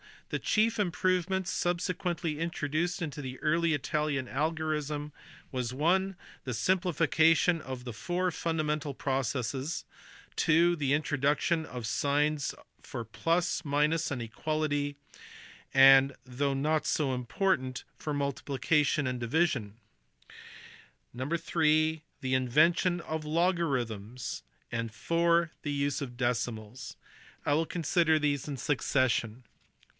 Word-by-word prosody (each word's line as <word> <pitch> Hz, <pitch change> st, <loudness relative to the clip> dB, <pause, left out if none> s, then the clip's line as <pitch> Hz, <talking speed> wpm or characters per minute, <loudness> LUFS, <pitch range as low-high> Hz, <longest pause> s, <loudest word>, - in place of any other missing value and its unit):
The -, -, -2 dB
chief 220 Hz, +1 st, +2 dB
improvements 185 Hz, 0 st, 0 dB
subsequently 175 Hz, -3 st, -1 dB
intro 165 Hz, -3 st, -2 dB
duced 175 Hz, +5 st, -1 dB
into 150 Hz, -2 st, -5 dB
the 130 Hz, -1 st, -6 dB
early 165 Hz, +1 st, +2 dB
Italian 145 Hz, -1 st, -1 dB
algorism 150 Hz, 0 st, -2 dB, 0.4 s
were 130 Hz, -, -1 dB, 0.3 s
(i) 190 Hz, +1 st, +2 dB, 0.3 s
the 130 Hz, -, -2 dB
simplification 165 Hz, +2 st, +3 dB
of 130 Hz, -3 st, -6 dB
the 120 Hz, -2 st, -6 dB
four 180 Hz, +9 st, -1 dB
fundamental 155 Hz, -3 st, -1 dB
processes: 135 Hz, +2 st, -2 dB, 0.6 s
(ii) 170 Hz, +2 st, +5 dB
the 145 Hz, -5 st, 0 dB
introduction 150 Hz, +2 st, +1 dB
of 125 Hz, -2 st, -6 dB
signs 145 Hz, +4 st, 0 dB, 0.3 s
for 120 Hz, -, -6 dB
plus, 170 Hz, +8 st, 0 dB
minus, 150 Hz, +3 st, +1 dB
and 130 Hz, -4 st, -3 dB
equality; 145 Hz, +3 st, -2 dB, 0.8 s
and 135 Hz, 0 st, +7 dB
(though 135 Hz, +2 st, -1 dB
not 150 Hz, +2 st, +1 dB
so 140 Hz, -4 st, +1 dB
im 125 Hz, -1 st, -3 dB
portant) 130 Hz, -, 0 dB
for 150 Hz, -, -4 dB
multiplication 145 Hz, +1 st, +1 dB
and 125 Hz, -1 st, -2 dB
division: 120 Hz, -5 st, 0 dB, 1.4 s
(iii) 155 Hz, +3 st, +1 dB, 0.2 s
the 130 Hz, 0 st, -1 dB
invention 165 Hz, +8 st, +3 dB
of 160 Hz, -1 st, -4 dB
logarithms: 130 Hz, -, -1 dB, 0.3 s
and 115 Hz, 0 st, -2 dB
(iv) 170 Hz, +8 st, +2 dB
the 145 Hz, -, -3 dB
use 140 Hz, 0 st, -1 dB
of 125 Hz, -3 st, -6 dB
decimals. 120 Hz, -1 st, -3 dB, 0.5 s
I 145 Hz, -, +2 dB
will 160 Hz, +2 st, +1 dB
consider 165 Hz, -1 st, +2 dB
these 145 Hz, -2 st, 0 dB
in 145 Hz, -, -3 dB
succession. 130 Hz, -3 st, 0 dB
150 Hz, 115 wpm, -30 LUFS, 130-165 Hz, 1.4 s, and